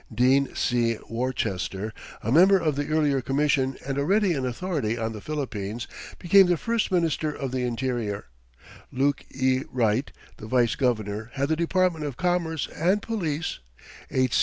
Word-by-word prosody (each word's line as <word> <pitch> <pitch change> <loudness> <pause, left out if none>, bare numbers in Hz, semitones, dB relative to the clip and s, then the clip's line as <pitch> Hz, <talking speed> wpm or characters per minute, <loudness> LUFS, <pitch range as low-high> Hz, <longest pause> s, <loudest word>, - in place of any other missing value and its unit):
Dean 130 +4 +3
C. 120 -2 +1
Worcester, 110 -4 -2 0.3
a 115 - -1
member 185 +7 +7
of 160 -5 0
the 145 0 -2
earlier 150 -3 +2
Commission 135 0 +1
and 135 0 -2
already 190 +5 +2
an 135 -4 -1
authority 125 - -2
on 110 -1 -2
the 105 - -8
Philippines, 120 -7 -4 0.3
became 190 +2 +6
the 175 -1 +2
first 230 +4 -1
Minister 165 -3 +1
of 135 -3 -4
the 130 -1 -1
Interior; 120 -4 -2 0.7
Luke 140 +2 +1
E. 130 0 +1
Wright, 120 +1 +1 0.3
the 110 - -9
Vice 120 -1 +2
Governor, 110 -4 -1
had 140 +2 0
the 160 - +2
Department 170 -1 +1
of 145 -4 -4
Commerce 175 -4 0
and 185 +6 +2
Police; 165 -9 -2 0.5
H. 130 -2 +2
135 Hz, 155 wpm, -26 LUFS, 120-160 Hz, 0.7 s, member